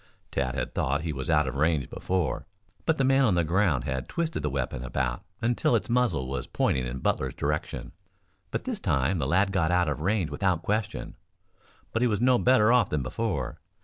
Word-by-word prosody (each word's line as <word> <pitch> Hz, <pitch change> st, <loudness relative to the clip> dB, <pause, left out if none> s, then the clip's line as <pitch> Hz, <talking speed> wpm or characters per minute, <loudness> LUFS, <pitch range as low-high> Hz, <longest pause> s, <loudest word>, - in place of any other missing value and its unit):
Tad 65 Hz, -2 st, -1 dB
had -, -, -3 dB
thought 70 Hz, +3 st, 0 dB
he 80 Hz, -2 st, -2 dB
was 65 Hz, +1 st, -5 dB
out 75 Hz, -3 st, +3 dB
of 65 Hz, -, -2 dB
range 75 Hz, -1 st, +1 dB
before, 90 Hz, -3 st, -2 dB, 0.4 s
but 160 Hz, -, +3 dB
the 135 Hz, -, +2 dB
man 135 Hz, +1 st, +4 dB
on 105 Hz, -8 st, +3 dB
the 85 Hz, -, +3 dB
ground 85 Hz, -6 st, +2 dB
had 65 Hz, -2 st, -3 dB
twisted 165 Hz, -1 st, -2 dB
the -, -, -1 dB
weapon 65 Hz, -2 st, -3 dB
about 65 Hz, -1 st, -2 dB, 0.2 s
until 120 Hz, +1 st, +2 dB
its 115 Hz, -, -1 dB
muzzle 120 Hz, -, +1 dB
was 70 Hz, +1 st, -3 dB
pointing 65 Hz, -1 st, 0 dB
in -, -, -4 dB
Butler's -, -, 0 dB
direction. 75 Hz, +2 st, -3 dB, 0.6 s
But -, -, -3 dB
this -, -, -3 dB
time 70 Hz, +7 st, +1 dB
the 65 Hz, -, 0 dB
lad 95 Hz, +5 st, +3 dB
got 90 Hz, -5 st, +1 dB
out 90 Hz, -1 st, +3 dB
of 75 Hz, 0 st, -2 dB
range 95 Hz, -1 st, 0 dB
without 90 Hz, -4 st, 0 dB
question. 105 Hz, -1 st, -2 dB, 0.8 s
But 115 Hz, -, 0 dB
he 125 Hz, -, +4 dB
was 105 Hz, -3 st, 0 dB
no 125 Hz, +1 st, +4 dB
better 120 Hz, -3 st, +5 dB
off 120 Hz, -6 st, +4 dB
than 75 Hz, -3 st, -1 dB
before. 65 Hz, -, -3 dB
85 Hz, 205 wpm, -27 LUFS, 70-110 Hz, 0.8 s, better